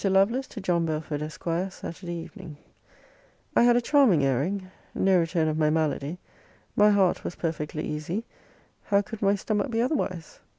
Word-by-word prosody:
LOVELACE, 195 Hz, +7 st, +2 dB
TO 225 Hz, -, -8 dB
JOHN 175 Hz, -4 st, +1 dB
BELFORD, 155 Hz, -1 st, -3 dB
ESQ. 150 Hz, -2 st, -7 dB, 0.3 s
SAT. 175 Hz, +1 st, -8 dB
EVENING. 165 Hz, -3 st, -7 dB, 1.0 s
I -, -, +6 dB
had 240 Hz, 0 st, +6 dB
a 245 Hz, -, +3 dB
charming 235 Hz, -, +4 dB
airing. 185 Hz, +9 st, -1 dB, 0.2 s
No 190 Hz, -1 st, +4 dB
return 165 Hz, -1 st, +1 dB
of 155 Hz, 0 st, -1 dB
my 155 Hz, -1 st, +3 dB
malady. 155 Hz, 0 st, -1 dB, 0.6 s
My 210 Hz, 0 st, +6 dB
heart 195 Hz, -3 st, +3 dB
was -, -, -5 dB
perfectly 155 Hz, -2 st, -3 dB
easy, 160 Hz, +9 st, -3 dB, 0.6 s
how 200 Hz, -1 st, +3 dB
could 215 Hz, +1 st, -8 dB
my 200 Hz, 0 st, +3 dB
stomach 210 Hz, +5 st, -1 dB
be 225 Hz, -1 st, -1 dB
otherwise? 230 Hz, -, -2 dB
180 Hz, 160 wpm, -26 LUFS, 155-205 Hz, 1.0 s, I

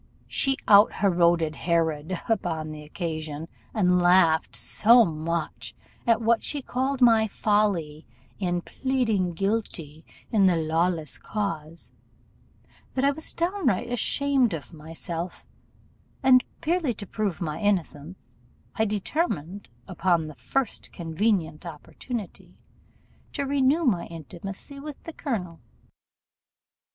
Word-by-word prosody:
She 270 Hz, -1 st, +2 dB
out 205 Hz, +1 st, +7 dB
heroded 170 Hz, -4 st, +2 dB
Herod 165 Hz, 0 st, 0 dB
upon 165 Hz, -8 st, -1 dB
the 155 Hz, 0 st, -8 dB
occasion; 155 Hz, -1 st, -5 dB, 0.2 s
and 180 Hz, -4 st, +3 dB
laughed 175 Hz, -3 st, +4 dB
so 235 Hz, +2 st, +5 dB
much 155 Hz, -, -3 dB, 0.3 s
at 230 Hz, 0 st, +3 dB
what 230 Hz, 0 st, +3 dB
she 290 Hz, -, -2 dB
called 265 Hz, +2 st, -2 dB
my 225 Hz, -2 st, +6 dB
folly 195 Hz, -8 st, 0 dB, 0.3 s
in 175 Hz, -2 st, 0 dB
pleading 225 Hz, -8 st, 0 dB
guilty 170 Hz, -6 st, -3 dB, 0.3 s
in 200 Hz, -4 st, +5 dB
the 180 Hz, -, +4 dB
Lawless 165 Hz, 0 st, 0 dB
cause, 165 Hz, -6 st, -4 dB, 1.0 s
that 265 Hz, +1 st, +2 dB
I 280 Hz, -, +5 dB
was 315 Hz, +3 st, -3 dB
downright 335 Hz, -, 0 dB
ashamed 265 Hz, -3 st, +2 dB
of 160 Hz, +2 st, -9 dB
myself, 165 Hz, +2 st, -6 dB, 0.8 s
and, 255 Hz, -1 st, +6 dB, 0.2 s
purely 320 Hz, -7 st, 0 dB
to 205 Hz, -, -7 dB
prove 200 Hz, -3 st, -2 dB
my 155 Hz, -4 st, -3 dB
innocence, 185 Hz, -4 st, -2 dB, 0.5 s
I 220 Hz, -, +3 dB
determined, 205 Hz, -, -2 dB, 0.2 s
upon 175 Hz, -3 st, +1 dB
the 155 Hz, -, -8 dB
first 200 Hz, -, -3 dB
convenient 170 Hz, -1 st, -1 dB
opportunity, 180 Hz, -, -8 dB, 0.8 s
to 285 Hz, -, -2 dB
renew 280 Hz, +3 st, +2 dB
my 190 Hz, -10 st, +1 dB
intimacy 185 Hz, -, -8 dB
with 295 Hz, 0 st, -9 dB
the 330 Hz, -, -8 dB
colonel. 180 Hz, -, -4 dB
185 Hz, 115 wpm, -26 LUFS, 165-235 Hz, 1.0 s, out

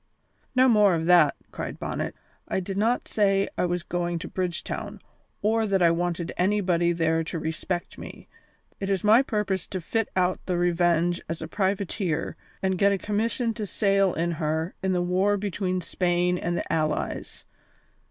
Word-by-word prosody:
"No 255 Hz, +1 st, +6 dB
more 210 Hz, -6 st, +5 dB
of 160 Hz, 0 st, -2 dB
that," 170 Hz, -4 st, +5 dB, 0.2 s
cried -, -, -5 dB
Bonnet. -, -, -3 dB, 0.3 s
"I -, -, 0 dB
did 190 Hz, +1 st, -5 dB
not 225 Hz, +5 st, +1 dB
say 195 Hz, -2 st, +2 dB
I -, -, +1 dB
was 175 Hz, 0 st, -1 dB
going 175 Hz, 0 st, -2 dB
to 165 Hz, -, -6 dB
Bridgetown, 180 Hz, -2 st, -4 dB, 0.4 s
or 220 Hz, +1 st, +2 dB
that 195 Hz, -2 st, +2 dB
I 170 Hz, -, +6 dB
wanted 170 Hz, 0 st, -2 dB
anybody 180 Hz, -3 st, +2 dB
there 165 Hz, -1 st, +1 dB
to 170 Hz, -, -4 dB
respect 160 Hz, +3 st, -4 dB
me. -, -, -10 dB, 0.5 s
It 195 Hz, -, -3 dB
is 195 Hz, -2 st, 0 dB
my 220 Hz, +4 st, +6 dB
purpose 210 Hz, -8 st, -1 dB
to 185 Hz, -, -4 dB
fit 225 Hz, +6 st, -1 dB
out 185 Hz, 0 st, +1 dB
the 180 Hz, -2 st, 0 dB
Revenge 175 Hz, 0 st, +2 dB
as 165 Hz, -, -3 dB
a -, -, -5 dB
privateer 190 Hz, -3 st, -1 dB, 0.3 s
and 190 Hz, -1 st, 0 dB
get 200 Hz, 0 st, +5 dB
a 200 Hz, -, +1 dB
commission 225 Hz, +4 st, -1 dB
to 215 Hz, -2 st, -4 dB
sail 195 Hz, -2 st, +2 dB
in 170 Hz, +1 st, 0 dB
her 160 Hz, +1 st, -2 dB
in 190 Hz, -1 st, 0 dB
the 180 Hz, -1 st, +1 dB
war 190 Hz, +3 st, +2 dB
between 190 Hz, -2 st, -2 dB
Spain 180 Hz, 0 st, +1 dB
and 175 Hz, 0 st, -1 dB
the -, -, -3 dB
Allies. 155 Hz, -1 st, -2 dB
180 Hz, 170 wpm, -26 LUFS, 170-200 Hz, 0.5 s, No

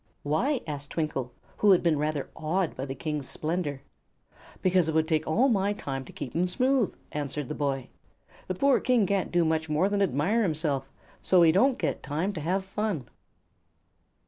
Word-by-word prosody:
"Why?" 240 Hz, -, +1 dB
asked 145 Hz, -2 st, -5 dB
Twinkle, 145 Hz, -6 st, -2 dB, 0.3 s
who 210 Hz, -, +3 dB
had 185 Hz, -, +5 dB
been 160 Hz, -4 st, +2 dB
rather 150 Hz, -2 st, -2 dB
awed 170 Hz, +3 st, -1 dB
by 135 Hz, +2 st, -4 dB
the 135 Hz, -, -4 dB
King's 150 Hz, -1 st, -4 dB
splendor. 155 Hz, -4 st, -3 dB, 0.8 s
"Because 180 Hz, -3 st, +3 dB
it 160 Hz, -, -1 dB
would 160 Hz, 0 st, +3 dB
take 155 Hz, -1 st, 0 dB
all 230 Hz, +12 st, +3 dB
my 205 Hz, -4 st, +2 dB
time 135 Hz, -9 st, -5 dB
to -, -, -11 dB
keep 135 Hz, -5 st, -7 dB
'em 175 Hz, +2 st, +2 dB
smooth," 250 Hz, +3 st, +2 dB, 0.2 s
answered 145 Hz, -1 st, -3 dB
the -, -, -2 dB
boy. 135 Hz, -3 st, -2 dB, 0.6 s
"The 185 Hz, -, -2 dB
poor 275 Hz, +6 st, +3 dB
King 250 Hz, -5 st, +3 dB
can't 195 Hz, 0 st, 0 dB
do 175 Hz, -1 st, +3 dB
much 160 Hz, 0 st, 0 dB
more 155 Hz, +6 st, +2 dB
than 205 Hz, 0 st, 0 dB
admire 190 Hz, -, +2 dB
himself, 150 Hz, -7 st, -1 dB, 0.3 s
so 180 Hz, -2 st, +5 dB
he 160 Hz, -, +6 dB
don't 245 Hz, +9 st, +3 dB
get -, -, -2 dB
time 160 Hz, +8 st, -2 dB
to 165 Hz, -, -5 dB
have 185 Hz, +5 st, -1 dB
fun." 195 Hz, -, -3 dB
160 Hz, 185 wpm, -28 LUFS, 145-195 Hz, 0.8 s, he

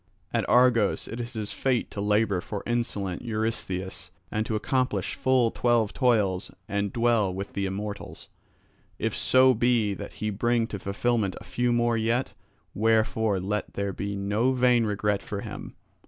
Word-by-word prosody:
At -, -, 0 dB
Argos 120 Hz, -4 st, +4 dB
it 115 Hz, -, -6 dB
is 120 Hz, +1 st, -5 dB
his 110 Hz, -3 st, -4 dB
fate 130 Hz, -3 st, 0 dB
to 100 Hz, -, -4 dB
labour 105 Hz, -2 st, +2 dB
for 100 Hz, +1 st, -5 dB
insolent 105 Hz, -6 st, -2 dB
Eurystheus 110 Hz, -5 st, -3 dB, 0.2 s
and 110 Hz, 0 st, -1 dB
to 110 Hz, -, -1 dB
accomplish 130 Hz, +4 st, 0 dB
full 130 Hz, -3 st, +2 dB
twelve 120 Hz, -3 st, +1 dB
toils 105 Hz, -8 st, +2 dB, 0.2 s
and 100 Hz, 0 st, -1 dB
dwell 115 Hz, -4 st, +2 dB
with 100 Hz, +2 st, -6 dB
the 100 Hz, -1 st, -1 dB
immortals, 100 Hz, +2 st, -6 dB, 0.7 s
if -, -, -1 dB
so 130 Hz, 0 st, +5 dB
be 120 Hz, -3 st, +2 dB
that -, -, -7 dB
he 105 Hz, 0 st, -3 dB
bring 120 Hz, +3 st, +1 dB
to 100 Hz, -, -5 dB
fulfilment 100 Hz, +1 st, 0 dB
a -, -, -12 dB
few 125 Hz, 0 st, 0 dB
more 120 Hz, -1 st, +2 dB
yet; 115 Hz, +3 st, 0 dB, 0.4 s
wherefore 110 Hz, -1 st, +2 dB
let 105 Hz, +3 st, -3 dB
there 100 Hz, -1 st, -2 dB
be 100 Hz, +2 st, -4 dB
no 105 Hz, +6 st, +1 dB
vain 125 Hz, -2 st, +3 dB
regret 105 Hz, -1 st, 0 dB
for 100 Hz, -1 st, -5 dB
him. -, -, -8 dB
110 Hz, 160 wpm, -27 LUFS, 100-120 Hz, 0.7 s, so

